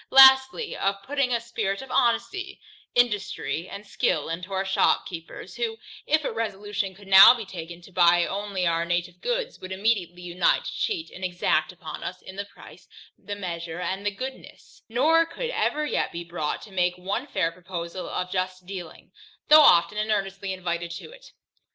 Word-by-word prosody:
Lastly, 265 - +7
of 195 0 -1
putting 275 +1 0
a 235 - +2
spirit 220 -4 -3
of 265 - -11
honesty, 365 +11 0 0.4
industry, 195 - 0
and 205 - -8
skill 200 - -1
into 180 +4 -5
our 190 0 -1
shopkeepers, 180 0 -1
who, 230 -2 -2 0.3
if 310 +1 +2
a - - -2
resolution 205 -3 -3
could 200 +1 -15
now 195 +5 +10
be 230 -3 -6
taken 170 -2 -9
to 190 - -15
buy 175 -1 +4
only 200 -2 -3
our 165 0 +1
native 175 +1 -2
goods, - - -2
would 185 - -9
immediately 190 -3 -1
unite 175 +1 +1
to - - -4
cheat 360 -7 -2
and 185 - -10
exact 180 -1 0
upon - - -8
us - - -6
in 190 - -10
the 200 +1 -4
price, 200 - -16 0.3
the 205 - -7
measure, 170 -3 -5
and 190 +2 -3
the 205 - +1
goodness, 255 +6 -9
nor 310 +8 +4
could 475 +9 -5
ever 305 -10 0
yet - - -1
be 170 - -5
brought 165 -3 -4
to 210 - -12
make 180 -1 0
one 200 +9 -3
fair 165 - 0
proposal 175 0 -6
of 180 0 -3
just 185 -1 -3
dealing, 180 -3 -9 0.4
though 305 +1 +10
often 210 - +5
and 215 +1 -1
earnestly 195 -1 -2
invited 175 -2 -3
to 170 - -8
it. - - -15
195 Hz, 180 wpm, -25 LUFS, 180-235 Hz, 0.4 s, now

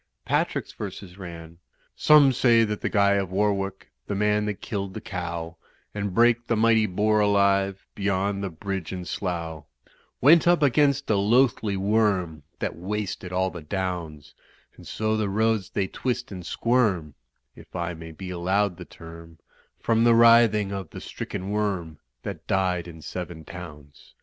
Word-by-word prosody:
Patrick's - - -1
verses 95 -2 -8
ran: 85 -2 -9 0.4
"Some 150 -3 +6
say 115 -2 +4
that 105 -1 -2
Guy 100 -1 +3
of 95 -2 -1
Warwick, 100 -1 -1 0.2
The 100 - -2
man 105 +1 +1
that 105 -2 -3
killed 100 -3 -4
the - - -4
Cow, 85 -5 -5 0.4
And 100 -1 -3
brake 120 +3 +3
the 115 - +1
mighty 110 0 +3
Boar 105 +3 +1
alive, 100 -1 +2
Beyond 100 0 -1
the 100 - -2
Bridge 95 +1 -5
at 90 -1 -5
Slough, 85 -5 -4 0.5
Went 165 +6 +6
up 175 -3 +4
against 140 0 +3
a 105 - +3
Loathly 110 -1 +2
Worm 95 -6 +1 0.2
That - - -3
wasted 95 0 -4
all 95 0 0
the 85 - -8
Downs, 85 -3 -4 0.4
And - - -14
so 110 0 -1
the 110 -2 -1
roads 110 -1 +1
they 100 - -1
twist 125 +5 -3
and 90 -2 -7
squirm 100 - 0 0.4
(If - - -15
I 85 -1 -2
may 80 0 -9
be 90 +4 -8
allowed 95 +2 0
the 90 - -9
term) 80 0 -12 0.4
From 115 0 +2
the 120 -1 +5
writhing 115 -3 +5
of 95 -4 -5
the - - -9
stricken 95 +2 -6
Worm 95 -7 -2 0.2
That - - -7
died 90 -2 0
in 80 -2 -11
seven 85 -2 -6
towns. 75 -5 -11
100 Hz, 160 wpm, -25 LUFS, 90-110 Hz, 0.5 s, Some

